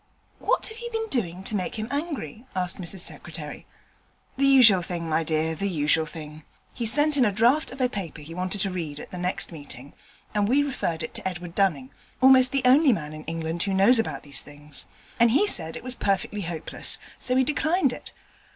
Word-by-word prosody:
'What - - +1
have 445 +1 -2
you 475 0 -5
been 445 -1 -3
doing 185 -8 -1
to 210 - -2
make 185 -3 -2
him 215 0 -3
angry?' 280 - -4
asked 185 0 -1
Mrs 175 +1 0
Secretary. - - -6 0.7
'The 275 +1 +2
usual 240 -9 +7
thing, 170 -1 -4
my 160 +1 +1
dear, 160 0 0
the 200 +5 -2
usual 160 -1 +1
thing: 155 -1 -9 0.3
he 235 - -3
sent 295 +5 +3
in 265 - +5
a 210 - +3
draft 240 +10 +3
of 260 - -10
a 255 - +3
paper 190 -9 -6
he 155 +3 -10
wanted 185 +3 -2
to 195 -1 +1
read 160 -5 -5
at - - -10
the 180 - -6
next 180 +1 +1
meeting, 145 -4 -9 0.4
and 205 -1 +1
we 280 +3 +4
referred 175 - -2
it - - -6
to - - -3
Edward 175 -2 -6
Dunning 160 -10 0 0.3
almost 260 0 +7
the 275 -1 0
only 270 +3 +6
man 155 -8 -3
in 155 0 -9
England 165 +1 -3
who 195 0 0
knows 215 +6 +6
about 225 - -2
these 140 -2 -3
things 145 0 -7 0.3
and 235 0 +6
he 280 - +3
said 165 - +2
it - - -8
was 255 0 -3
perfectly 205 -1 -1
hopeless, 165 -3 -2 0.2
so 250 - 0
we 260 - +4
declined 300 +1 +1
it. - - -8
195 Hz, 210 wpm, -25 LUFS, 165-255 Hz, 0.7 s, usual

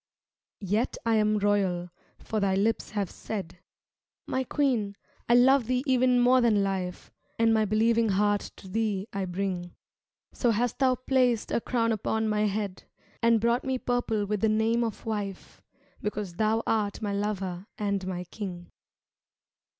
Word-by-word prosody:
Yet 210 +5 0
I 225 -1 +3
am 215 0 +2
royal, 195 -4 +1 0.3
for 220 - -3
thy 195 -2 +1
lips 215 +4 0
have 205 -4 -2
said: 185 -5 -6 0.3
" - - -67 0.3
My 260 - -1
queen, 245 -8 0 0.3
I 240 - +6
love 255 0 +5
thee 255 0 0
even 255 -2 +3
more 250 +1 +5
than 215 -4 +3
life, 185 -2 -3 0.3
And 225 0 +4
my 220 -1 +3
believing 225 +2 +2
heart 205 +1 +1
to - - -13
thee 205 0 -1
I 195 -1 -2
bring." 180 -1 -3 0.6
So 245 - +1
hast 235 +2 0
thou 260 -2 +4
placed 250 -3 +1
a - - +1
crown 230 -2 0
upon 220 +1 -1
my 210 0 +1
head 200 -2 -3 0.4
And 230 -1 +4
brought 235 +3 +1
me 265 -1 -1
purple 245 -4 -1
with 205 0 -2
the 220 - +3
name 220 +2 +2
of 225 -3 -4
wife, 205 -4 -5 0.4
Because 210 -3 -3
thou 220 +1 +1
art 210 -3 0
my 205 -1 -1
lover 195 -2 -3
and 200 -2 -1
my 180 -1 -3
king. 180 -2 -7
215 Hz, 160 wpm, -28 LUFS, 195-230 Hz, 0.6 s, I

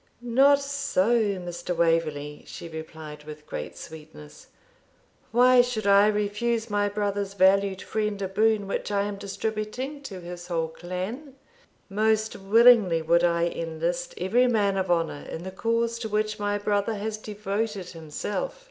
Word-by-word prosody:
'Not 265 +4 +4
so, 275 -6 +1
Mr. 180 -4 -3
Waverley,' 155 -3 0
she - - -8
replied, 160 -2 -9
with 150 0 -10
great 75 - -6
sweetness. 75 - -12 0.8
'Why 250 +2 +6
should 245 -4 -3
I 200 +1 +6
refuse 215 +2 -1
my 205 0 +1
brother's 200 -1 -2
valued 195 0 +3
friend 210 -2 -2
a 195 - -2
boon 215 +1 +2
which - - -3
I 200 -1 +1
am 205 0 -4
distributing 215 +7 -4
to 195 -9 -8
his 175 0 -8
whole 165 -2 -1
clan? 185 - -6 0.5
Most 220 +2 +1
willingly 205 -4 +5
would 170 +2 +3
I 170 -1 +2
enlist 170 +1 -3
every 235 +8 +2
man 205 -5 +2
of 190 -1 -1
honour 165 -4 0
in 165 - -6
the 190 - -6
cause 230 +3 -1
to 225 -2 -4
which 215 0 -1
my 205 0 0
brother 205 +2 0
has 215 +1 -4
devoted 210 -2 -3
himself. 205 - -4
200 Hz, 150 wpm, -26 LUFS, 175-220 Hz, 0.8 s, Why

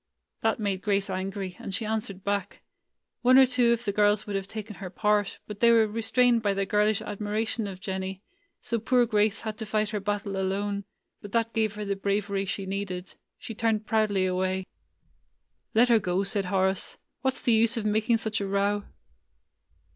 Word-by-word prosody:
That 225 0 +1
made 200 -3 -1
Grace 200 -2 0
angry, 190 0 -4
and 195 - -4
she 220 - -2
answered 210 -3 -3
back. 200 -1 -2 0.6
One 255 +1 +6
or 265 - +9
two 250 -2 +3
of 235 +1 0
the 200 - +1
girls 205 +1 +3
would 205 - -4
have 195 0 -2
taken 210 -2 -7
her 190 0 -6
part, 210 +1 +1
but 210 -1 -8
they 235 - +6
were 230 -1 +6
restrained 230 +2 +2
by 200 -2 +1
their 195 0 0
girlish 210 +1 +2
admiration 210 +2 -2
of 190 -2 -7
Jennie; 190 0 -4 0.4
so 230 - -1
poor 245 +2 +3
Grace 215 -1 +1
had 220 0 -5
to 220 - -4
fight 215 0 0
her 210 - -1
battle 200 0 -2
alone; 200 +1 -1 0.4
but 205 - -10
that 230 -1 +1
gave 220 -2 0
her 210 0 -4
the 200 0 -1
bravery 200 0 -1
she 195 +1 -3
needed. 190 -1 -4 0.2
She 225 - -7
turned 220 -1 0
proudly 215 -4 +2
away. 185 0 0 1.1
"Let 240 +3 +5
her 230 -2 +6
go," 185 0 0
said 200 0 -1
Horace. 190 0 0 0.2
"What 265 -1 +1
's - - -4
the 235 - +3
use 230 +2 +3
of 220 - -2
making 220 +2 +2
such 220 -1 -2
a 200 - -2
row?" 200 +1 0
205 Hz, 190 wpm, -27 LUFS, 195-220 Hz, 1.1 s, or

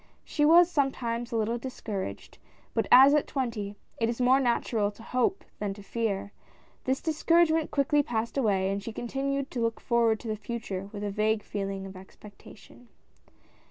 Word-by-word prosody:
She 295 - +1
was 340 +3 +7
sometimes 245 -5 -1
a - - -2
little 225 +2 0
discouraged, 220 -6 -6 0.3
but - - 0
as 265 +3 +9
at 300 - +2
twenty, 225 -7 -3 0.2
it 230 0 +1
is 235 - -3
more 255 +2 +4
natural 235 -4 +1
to 210 +2 -13
hope 255 +11 0
than 200 -2 -3
to 205 - -12
fear, 205 -2 -2 0.5
this 260 +1 0
dis 315 -2 -3
couragement 330 -2 +4
quickly 290 +1 +2
passed 230 -4 -3
away, 195 -7 +1
and 200 0 -2
she 225 +2 -7
continued 275 +4 -3
to 245 - -3
look 230 -1 -1
forward 230 -2 +2
to - - -8
the 215 - -1
Future 205 -4 -5
with 205 -1 -6
a 205 - -2
vague 215 +1 0
feeling 195 -1 -4
of 190 0 -9
expectation. 205 +5 -15
230 Hz, 175 wpm, -28 LUFS, 205-270 Hz, 0.5 s, as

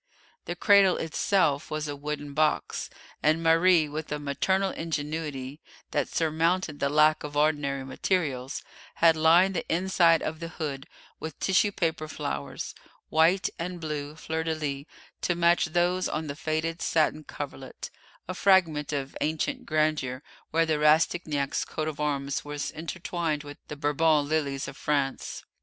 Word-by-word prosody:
The - - -4
cradle 200 -3 +5
itself 160 -2 +1
was 155 0 -3
a 145 - -4
wooden 145 0 -5
box, 155 +1 0 0.3
and 155 +2 +2
Marie, 165 0 +5
with 150 +1 -6
a 150 - 0
maternal 190 +7 0
ingenuity 150 -3 -4 0.3
that - - 0
surmounted 165 0 0
the 140 - +1
lack 155 +1 +4
of 145 -1 -5
ordinary 145 -3 +1
materials, 135 -3 -1 0.3
had 165 -1 +5
lined 170 +5 +5
the 165 - -2
inside 170 -1 +3
of 155 0 -3
the 165 - -5
hood 145 -5 -5 0.3
with 160 -2 -7
tissue 195 +2 +3
paper 160 -4 -1
flowers; 70 - -5 0.4
white 165 +4 +4
and 175 +1 -4
blue 150 -2 -4
fleurs 160 0 -3
de 160 -1 0
lis 140 -2 -3 0.4
to 175 - +1
match 170 0 +4
those 175 +2 +1
on 155 +1 -2
the 140 -1 -5
faded 160 +2 -2
satin 155 -1 +1
coverlet, 135 -3 -7 0.4
a 185 - -3
fragment 175 -7 +3
of 140 -2 -3
ancient 205 - -1
grandeur 155 -4 0 0.3
where 165 +1 +2
the 155 -2 0
Rastignac 150 -2 +2
coat 155 -1 -3
of 155 -1 -5
arms 140 -2 -1
was 145 0 -4
intertwined 165 -1 -3
with 145 0 -10
the 150 - -6
Bourbon 150 0 +2
lilies 145 -3 -1
of 135 - -8
France. 140 -2 -2
155 Hz, 150 wpm, -27 LUFS, 145-165 Hz, 0.4 s, cradle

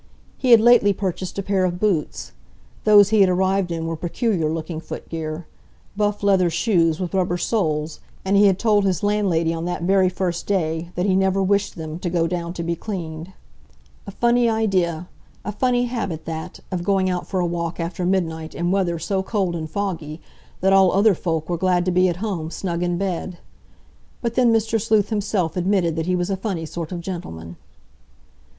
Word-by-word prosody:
He 255 - 0
had 235 -2 +9
lately 225 -3 +5
purchased 185 -1 -4
a 200 - -2
pair 195 -1 +1
of 175 -1 -1
boots. 190 -7 -1 0.5
Those 205 -2 +7
he 215 -1 +4
had 190 - +5
arrived 190 0 +1
in 165 -1 -3
were 165 0 -2
peculiar 175 0 -1
looking 160 0 -4
footgear, 160 0 -6 0.5
buff 205 0 -1
leather 190 -3 +3
shoes 165 -3 +1
with 180 -1 -4
rubber 180 -2 +1
soles, 155 -6 -1 0.3
and 195 +1 +2
he 200 +1 +6
had 190 -2 +3
told 210 -2 +2
his 185 -2 0
landlady 190 -6 +1
on 165 0 -4
that 175 -1 -3
very 190 0 +3
first 180 -2 -3
day 165 -4 -1
that 180 - 0
he 190 -2 +2
never 190 0 +2
wished 200 +1 +1
them 160 0 -6
to 180 - -3
go 170 -1 +1
down 170 0 -3
to 170 - -5
be 170 0 -1
cleaned. 170 -3 -6 0.8
A - - -4
funny 240 +3 +2
idea—a 185 -4 -2
funny 245 +3 +1
habit 200 -10 -4
that, 160 -1 -6
of 180 -2 -2
going 190 0 +2
out 180 -1 -2
for 190 - -2
a 180 - +1
walk 170 0 -3
after 170 +1 -3
midnight 165 -4 -1
in 175 +1 -1
weather 185 -3 +1
so 190 +4 -1
cold 190 -3 -1
and 160 -1 -5
foggy 165 -5 -4 0.4
that 190 +1 +3
all 190 -1 +6
other 205 +2 +5
folk 160 -3 -2
were 175 - -1
glad 180 0 +1
to 185 - +1
be 180 +1 +3
at 175 - -2
home, 170 -7 -3
snug 170 0 -3
in 175 -1 0
bed. 185 -1 -3 0.9
But 235 -1 -1
then 245 -1 +4
Mr. 225 0 +1
Sleuth 215 -2 +2
himself 200 -6 -1
admitted 180 -2 +1
that 165 0 -2
he 185 - +2
was 175 +2 -1
a 195 - -1
funny 185 -5 -3
sort 165 +1 -6
of 175 -2 -4
gentleman. 85 - -7
185 Hz, 195 wpm, -22 LUFS, 170-200 Hz, 0.9 s, had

